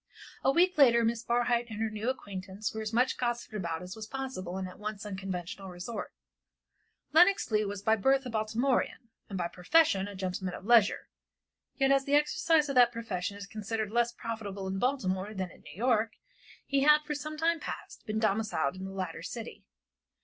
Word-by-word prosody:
A - - +4
week 350 +2 +3
later 235 -4 +7
Miss 230 0 0
Barhyte 240 0 +1
and 215 -1 -6
her 225 -1 0
new 215 +3 -2
acquaintance 200 -4 -4
were 220 - -4
as 215 0 -3
much 250 +3 +2
gossiped 240 -2 -2
about 170 -5 -3
as 180 +1 -7
was 220 -1 -7
possible 255 -9 -5
in 190 - -3
that 185 +1 -10
once 210 -1 -5
unconventional 190 -1 -5
resort. 180 +6 -6 1.0
Lenox 355 - +5
Leigh 215 0 +2
was 200 0 -5
by 220 +1 +4
birth 265 +5 +2
a 250 - -5
Baltimorean, 230 +2 0 0.2
and 195 - -4
by 175 -1 0
profession 195 - +3
a 205 - -8
gentleman 185 -1 -3
of - - -10
leisure, 230 -3 +4 0.7
yet 270 -1 +3
as 275 0 +3
the 285 - +2
exercise 310 +1 +3
of 275 - -2
that 245 -2 +6
profession 200 -4 -4
is 200 - -7
considered 215 +1 -3
less 240 +1 +2
profitable 215 -5 -5
in 190 0 -2
Baltimore 210 -6 -1
than 185 -2 -3
in - - -17
New 150 0 -12
York, 225 0 +1 0.5
he 280 - +1
had, 300 +1 +6
for 300 0 -3
some 305 +1 -5
time 330 +1 +2
past, - - -7
been 215 0 -1
domiciled 215 -9 +1
in 190 0 -6
the 195 - -6
latter 185 -4 -4
city. 230 +6 -7
220 Hz, 195 wpm, -30 LUFS, 195-255 Hz, 1.0 s, later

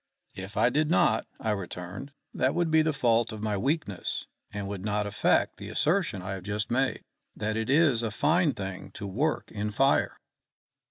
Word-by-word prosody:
"If 95 +2 -8
I 115 +3 +4
did 150 +3 +1
not," 115 -9 +3
I 110 - -1
returned, 95 +4 -5 0.2
"that - - +1
would 170 -2 +1
be 160 0 +6
the 155 0 +2
fault 120 -5 +2
of 110 -1 -7
my 105 -1 0
weakness, 135 - -2 0.3
and 100 -1 -4
would 100 -2 -5
not 105 0 0
affect 105 - +2
the - - -8
assertion 160 - +1
I 95 - -4
have 95 -2 -6
just 105 +2 -2
made, 130 +2 +1 0.3
that 110 0 -2
it 110 +1 -2
is 140 -5 +4
a 115 - -1
fine 150 - +2
thing 95 -2 -6
to 105 - -6
work 135 +11 -1
in 105 0 -2
fire." 135 +6 +2
110 Hz, 185 wpm, -28 LUFS, 100-145 Hz, 0.3 s, be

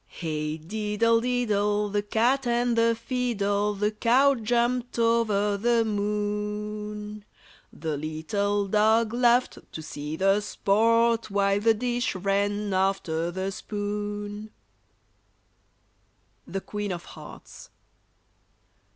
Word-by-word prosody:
] - - -42
Hey 155 -2 -4
diddle 215 +6 0
diddle, 210 -4 0
The 205 +1 0
cat 240 +6 +1
and 240 0 +1
the 230 0 +3
fiddle, 210 -4 -1
The 210 +1 0
cow 250 +6 +4
jumped 240 +1 0
over 220 -3 +2
the 230 +2 +2
moon, 210 0 -3 0.5
The 155 -2 -4
little 200 +7 -1
dog 220 +2 +3
laughed 245 +1 +2
To 160 - -6
see 150 0 -6
the 195 +4 +3
sport, 230 +3 +2
While 200 0 +2
the 225 +1 +3
dish 240 0 -1
ran 200 +2 0
after 185 -4 0
the 190 +2 -3
spoon. 205 +1 -5
[Illustration: - - -36 1.9
THE 195 - -4
QUEEN 205 0 -4
OF 175 -1 -7
HEARTS. - - -12
210 Hz, 110 wpm, -26 LUFS, 200-230 Hz, 1.9 s, cow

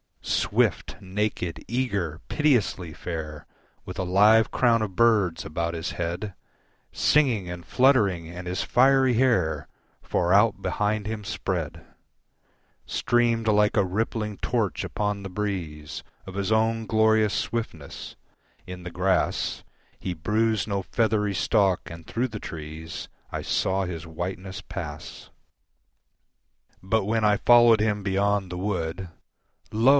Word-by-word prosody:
Swift, - - +1
naked, 95 -3 -3
eager, 100 -10 -1
pitilessly 120 - +1
fair, 75 -2 -6 0.4
With 90 0 -7
a - - 0
live 105 +5 +5
crown 115 -2 +3
of 100 -4 -3
birds 105 -8 +3
about 85 +2 -2
his 80 +1 -3
head, 90 +4 -3 0.6
Singing 125 -11 +2
and 90 -1 -6
fluttering, 105 -11 +3
and 90 +2 -8
his 90 +1 -1
fiery 130 0 +4
hair, 95 - +2 0.3
Far 90 +1 0
out 105 0 +4
behind 105 +1 -1
him 110 -1 -4
spread, 90 -5 -3 1.0
Streamed 115 -2 +1
like 105 0 +3
a 100 - +4
rippling 105 +2 -2
torch 110 -8 -1
upon 105 -1 -2
the 100 - -6
breeze 90 -7 -4 0.2
Of 95 - -8
his 100 +1 -2
own 110 0 +1
glorious 110 -1 +3
swiftness: 85 -11 -4 0.5
in 90 0 -8
the 90 - -6
grass 95 +2 0 0.4
He 90 - -3
bruised 110 +5 0
no 100 -2 -1
feathery 105 -1 0
stalk, 95 -1 +2
and 85 -1 -10
through 125 +2 -1
the 105 -2 -6
trees 80 0 -7 0.2
I - - -4
saw 95 0 0
his 85 -2 -6
whiteness 95 +4 -5
pass. 80 -6 -8 1.5
But 95 +2 0
when 110 +1 0
I 105 -1 +4
followed 120 -1 +6
him 105 -1 +1
beyond 100 -1 0
the 90 - -4
wood, 90 -2 -2 0.6
Lo! 115 +4 +3
100 Hz, 130 wpm, -26 LUFS, 90-110 Hz, 1.5 s, followed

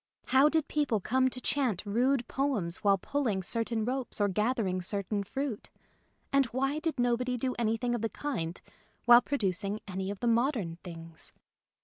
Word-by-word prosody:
How 265 +3 +6
did 315 -1 +1
people 285 -8 +1
come 260 +6 +2
to 255 - -4
chant 255 -8 0
rude 245 +5 +1
poems 230 -12 -1
while 200 -1 +3
pulling 220 -4 -1
certain 230 +2 -1
ropes 255 -1 -2
or 205 - +3
gathering 210 -2 0
certain 200 +2 -2
fruit, 265 +2 -4 0.6
and 275 -2 +4
why 270 +5 -1
did 315 -4 -2
nobody 245 +1 +1
do 255 +1 -1
anything 235 +1 0
of 240 - -1
the 225 - 0
kind 180 - -3 0.5
while 240 0 +9
producing 205 -6 -1
any 190 0 -3
of 200 -1 -5
the - - -3
modern 230 - +1
things 165 -2 -6
235 Hz, 160 wpm, -30 LUFS, 200-260 Hz, 0.6 s, while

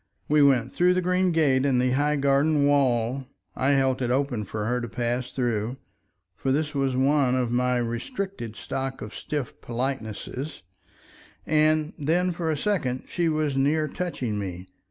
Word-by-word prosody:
We 150 0 +4
went 130 -3 +3
through 180 +1 +3
the 185 - +2
green 180 +1 +2
gate 140 -5 +3
in 135 -3 +2
the 125 0 +2
high 145 +3 +2
garden 140 +1 +3
wall. 130 -2 +2 0.3
I 135 +2 +2
held 135 -1 +2
it 125 - 0
open 125 -4 0
for 105 +2 -4
her 125 +2 0
to 120 - -4
pass 120 +2 -2
through, 120 -1 -1 0.6
for 135 - -1
this 150 +2 0
was 135 -2 0
one 135 -1 +3
of 125 -2 0
my 125 +1 +2
restricted 120 - -4
stock 135 0 -4
of 105 - -8
stiff 145 -5 -5
politenesses, 125 +1 -4 0.8
and 155 0 +2
then 175 +5 +1
for 170 -1 -2
a 155 - 0
second 140 -9 -1
she 170 -2 0
was 155 -3 0
near 150 +3 +2
touching 130 - -3
me. 90 -2 -5
135 Hz, 165 wpm, -26 LUFS, 125-150 Hz, 0.8 s, We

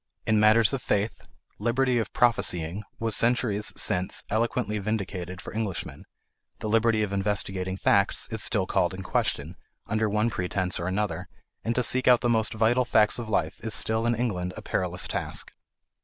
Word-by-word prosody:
In 110 -1 +3
matters 110 +2 +5
of 135 - -2
faith, 105 +1 -1 0.4
"liberty 125 +3 +1
of 110 - -3
prophesying" 95 -6 +1
was 115 -2 -1
centuries 115 -3 +1
since 90 +1 +1
eloquently 110 -1 0
vindicated 95 -4 -4
for - - -9
Englishmen; 110 -4 -4 0.5
the - - -5
liberty 115 0 +2
of 100 -1 -3
investigating 95 -2 0
facts 100 +1 +2
is - - -1
still - - +2
called - - 0
in - - -7
question, 80 +5 -2 0.3
under 110 +1 0
one 105 +3 +1
pretence 90 -1 -1
or 85 - -3
another, 95 -2 -2 0.4
and 115 +1 -1
to 125 - +1
seek 130 +2 +2
out 125 -1 +6
the 120 - +1
most 110 0 +1
vital 115 +3 +3
facts 110 -2 +3
of 115 -2 -6
life 80 -6 -1
is 110 -1 -1
still 110 +1 +1
in 120 - +2
England 90 -7 -2
a - - -8
perilous - - -1
task. - - -2
110 Hz, 170 wpm, -26 LUFS, 95-115 Hz, 0.5 s, out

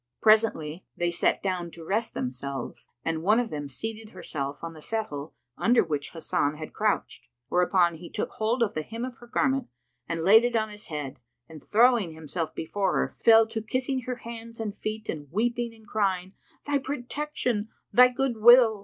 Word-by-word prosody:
Presently 205 -7 +3
they 175 0 +1
sat 170 - +1
down 180 -3 -1
to 165 -1 -11
rest 220 +6 -1
themselves, 130 +1 -5 0.2
and 160 -1 -1
one 210 +7 +4
of 240 -2 -2
them 145 -2 -4
seated 220 - -6
herself 145 -5 -5
on 165 0 -5
the 155 - -12
settle 155 -9 -4 0.2
under 240 +1 +4
which 150 -4 -3
Hasan 155 -3 -1
had 155 0 -8
crouched: 210 -1 -1 0.2
whereupon 175 -1 +3
he 170 +1 -10
took - - -3
hold 230 +3 +1
of 210 - -1
the 155 - -2
hem 230 +9 -5
of 255 -2 -8
her 240 - -13
garment 265 +2 +1 0.4
and 165 - -1
laid 215 +6 +7
it 240 -1 0
on 220 -1 +1
his 210 0 -8
head 145 -3 -5 0.3
and 155 -2 -12
throwing 225 -6 +4
himself 160 +1 -4
before 195 +4 -1
her, - - +1
fell 225 -1 +5
to 225 -1 -3
kissing 255 +4 -1
her 250 - -1
hands 230 -1 -9
and 215 -2 -3
feet 215 0 -5
and 145 -3 -5
weeping 235 +4 0
and 220 -1 -18
crying, 190 -3 -1 0.3
"Thy 290 -1 +1
protection! 260 -4 -2 0.2
thy 250 +1 +9
good 250 -1 -1
will!" 230 -1 +7
215 Hz, 185 wpm, -27 LUFS, 165-235 Hz, 0.4 s, thy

